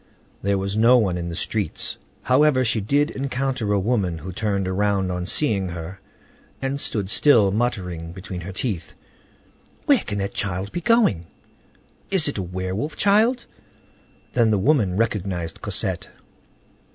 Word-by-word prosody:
There 100 0 +1
was 100 +1 -2
no 115 +3 +6
one 100 -7 +1
in 85 -1 -3
the 85 - -5
streets. 100 0 -2 0.2
However, 130 0 +4
she 115 -2 +1
did 145 - +1
encounter 130 -4 -2
a 100 - +3
woman, 95 -5 0
who 90 +4 -7
turned 100 -1 -1
around 95 0 +1
on 90 0 -3
seeing 100 -10 +1
her, 85 +3 -7 0.6
and 135 +1 -2
stood 100 -4 -2
still, 115 -10 +5
muttering 90 -7 -2
between 90 0 -7
her 90 +3 -6
teeth: 95 -4 -4 0.9
"Where - - +5
can 105 - -4
that 100 0 -2
child 95 0 -3
be 175 - -3
going? 160 - +3 0.8
Is 190 -6 +2
it 140 - -2
a - - 0
werewolf 95 - -3
child?" 220 +5 +3 0.9
Then 115 -3 +3
the 105 - +3
woman 100 -4 +2
recognized 95 -7 -2
Cosette. - - -3
100 Hz, 150 wpm, -23 LUFS, 95-125 Hz, 0.9 s, no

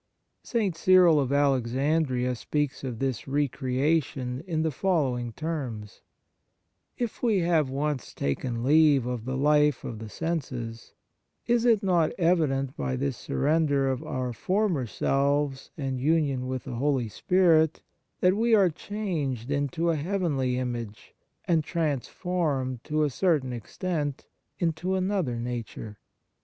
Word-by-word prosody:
St. 210 -8 -1
Cyril 180 -3 +5
of 135 -2 0
Alexandria 135 -1 +1
speaks 145 +4 -2
of 125 -4 -4
this 130 0 -2
re 145 +2 +1
creation 130 -1 -1
in 160 -3 0
the 160 - 0
following 130 -8 0
terms: 125 -8 -5 0.5
" - - -50
If - - -20
we 220 -6 +2
have 165 -5 +2
once 140 -1 -3
taken 115 - -2
leave 145 -2 +5
of 125 -2 -4
the 130 +1 -2
life 150 -1 +3
of 110 - -6
the 110 -1 -7
senses, 125 - -4 0.5
is 240 0 +2
it 225 -3 +4
not 175 -4 +2
evident 155 -7 +1
by 65 -2 -2
this 70 +2 -1
surrender 140 - +1
of 130 - -3
our 125 -1 -3
former 180 - 0
selves 140 +3 0
and 135 -3 -3
union 140 -4 +1
with 130 -1 -3
the - - -6
Holy 135 -2 +1
Spirit 160 - +2 0.4
that 180 +1 +4
we 230 +2 +3
are 195 -4 +4
changed 155 - -3
into 145 +4 0
a - - 0
heavenly 145 -7 0
image, 120 -4 -5 0.3
and 165 -3 +2
transformed, 150 -4 -2
to 155 0 +1
a 145 - +1
certain 145 -5 +1
extent, 145 - -3 0.3
into 175 +2 -1
another 185 -9 0
nature 115 -3 -6
145 Hz, 135 wpm, -27 LUFS, 125-165 Hz, 0.5 s, Cyril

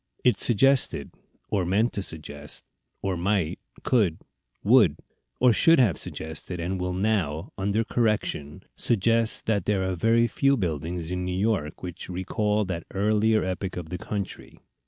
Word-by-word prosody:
It 125 - +3
suggested, 120 - +3 0.4
or 95 - +1
meant 100 +7 +1
to 100 - -2
suggest, 75 -4 -6 0.4
or 95 -1 0
might, 90 -1 0 0.2
could, 100 -10 +2 0.5
would, 105 - +5 0.4
or 125 -2 +5
should 165 +8 +5
have 115 - +4
suggested, 80 +3 -5
and 90 +3 -2
will 90 0 -2
now, 95 -5 0
under 100 +3 0
correction, 105 -11 -1
suggest 115 +1 +1
that 105 -5 0
there 95 -3 +1
are 95 - -1
very 115 +6 +3
few 140 +3 +2
buildings 85 - -3
in 90 0 -2
New 90 0 -2
York 100 -8 -1
which 90 0 -7
recall 105 +3 0
that 90 -3 -5
earlier 110 +2 +2
epoch 95 0 -3
of 85 -3 -6
the 90 - -4
country. 100 0 -6
95 Hz, 150 wpm, -26 LUFS, 90-110 Hz, 0.5 s, would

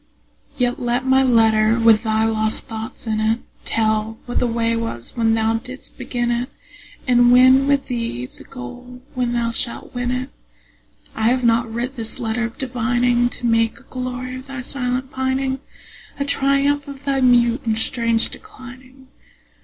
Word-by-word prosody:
Yet 245 -2 0
let 245 +1 -1
my 265 0 +4
letter 225 -3 +4
with 225 -1 +5
thy 220 -1 +1
lost 220 0 0
thoughts 220 +1 -7
in 215 -1 -1
it 220 +1 +2 0.3
Tell 220 0 0
what 245 - -1
the 245 - +1
way 230 0 0
was 230 - -5
when 225 -1 +2
thou 225 0 +1
didst 255 +1 -9
begin 240 -1 -2
it, 240 +1 -1 0.6
And 245 -1 +5
win 260 +2 +6
with 280 -1 +2
thee 230 - -3
the - - -14
goal 245 - -10
when 250 -2 -1
thou 235 -1 0
shalt 235 0 -3
win 245 -1 -2
it. 255 +2 -2 0.8
I 220 +1 +1
have 255 +1 +1
not 230 0 +2
writ 245 +4 -4
this 225 -1 -4
letter 235 +1 -1
of 230 - -7
divining 245 -1 +1
To 245 - -6
make 230 -1 +2
a - - -20
glory 255 0 -5
of 260 +1 -11
thy 275 -2 -6
silent 255 0 -3
pining, 265 0 -1 0.6
A 280 - 0
triumph 280 +1 +2
of 280 0 -10
thy 275 -1 +1
mute 240 0 +4
and 220 -3 0
strange 230 0 +2
declining. 260 - -12
245 Hz, 170 wpm, -20 LUFS, 225-255 Hz, 0.8 s, win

